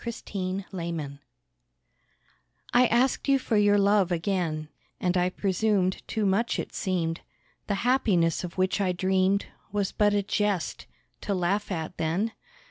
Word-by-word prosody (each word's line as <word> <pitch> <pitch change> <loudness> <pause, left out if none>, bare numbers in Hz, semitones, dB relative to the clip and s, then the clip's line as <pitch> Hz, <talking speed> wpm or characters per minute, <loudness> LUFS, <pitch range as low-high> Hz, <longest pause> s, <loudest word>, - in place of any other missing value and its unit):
RESIGNATION 185 - -4 1.5
I 245 +1 +6
asked 245 +5 +1
you 275 0 +5
for 255 -3 -2
your 205 0 +5
love 200 -2 +3
again, 165 -3 -1 0.3
And 180 0 0
I 180 0 +2
presumed 190 0 0
too 215 -2 -1
much 200 +5 +1
it - - -5
seemed. 175 -4 -1 0.5
The 205 - 0
happiness 195 -11 +2
of 175 0 -7
which 185 +2 +1
I 185 -2 +1
dreamed 190 +2 +1 0.3
Was 205 -2 -1
but 205 -1 +2
a 205 - +1
jest, 200 -3 -1 0.3
to 200 - -1
laugh 195 +3 0
at 165 0 -4
then? 175 +8 0
190 Hz, 135 wpm, -27 LUFS, 180-205 Hz, 1.5 s, I